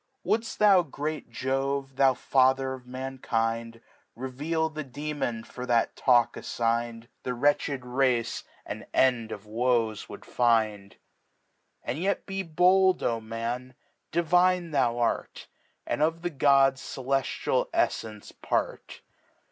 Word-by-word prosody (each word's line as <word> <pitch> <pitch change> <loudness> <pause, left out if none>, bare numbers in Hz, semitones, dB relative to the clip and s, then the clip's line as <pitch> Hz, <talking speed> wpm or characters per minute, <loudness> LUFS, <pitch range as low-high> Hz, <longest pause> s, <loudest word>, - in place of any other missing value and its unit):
Woulcfe 225 +1 0
thou, 200 -3 +6
grt^LtJoue^ 135 -2 -3
thou 135 -1 +4
Father 130 0 +2
of 125 -1 -10
Mankind, 115 -3 -3 0.3
Reveal 145 +6 -2
the 155 -1 -5
Demon 140 -4 -4
for 125 +2 -8
that 120 -2 +2
Talk 120 -3 +3
affign'd, 115 0 -2 0.2
iThe 125 -1 -4
wretched 140 -1 +1
Race 125 -2 0 0.2
an - - -7
End 120 -4 +3
of 105 0 -7
Woes 115 -1 0
would - - -10
find. 110 -4 +1 0.9
And 125 +6 -3
yet 195 +3 -1
be 195 0 -3
bold, 185 +2 +3
O 115 -1 0
Man, 115 +3 -5 0.4
divine 175 +1 +2
thou 125 -5 +1
art. 120 -1 -1 0.4
And - - -2
of 165 +2 +1
the 175 - -1
Gods 135 -2 +4
celeftial 135 0 -1
EfTence 110 -2 -2
Part. - - -2
130 Hz, 120 wpm, -27 LUFS, 115-150 Hz, 0.9 s, thou